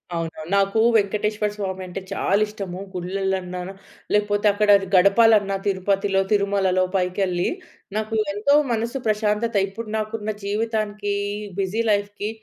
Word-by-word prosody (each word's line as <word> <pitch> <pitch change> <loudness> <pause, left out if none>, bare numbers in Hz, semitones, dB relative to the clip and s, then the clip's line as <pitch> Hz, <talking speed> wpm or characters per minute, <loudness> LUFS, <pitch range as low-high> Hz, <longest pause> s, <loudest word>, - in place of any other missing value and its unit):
అవునవును. 165 -1 -5
నాకు 195 +2 +2 0.2
వెంకటేశ్వర 210 0 +1
స్వామి 190 -2 -4
అంటే 180 +2 -6
చాలా 195 0 +1
ఇష్టము. 195 -4 -6
గుళ్లలన్నా 185 0 -2 0.5
లేకపోతే 205 0 +1
అక్కడ 205 +1 0 0.3
గడపాలన్న 200 +1 +5
తిరుపతిలో, 195 0 +1
తిరుమలలో 200 -2 +2
పైకెళ్ళి, 180 -1 0 0.5
నాకు 215 +1 -2 0.2
ఎంతో 220 +8 +3 0.2
మనసు 230 +3 -1
ప్రశాంతత! 215 +1 0
ఇప్పుడు 215 +3 -8
నాకున్న 215 0 -3
జీవితానికి 210 -1 -1 0.5
బిజీ 195 +4 0
లైఫ్‌కి 205 0 -1
205 Hz, 110 wpm, -23 LUFS, 190-215 Hz, 0.5 s, గడపాలన్న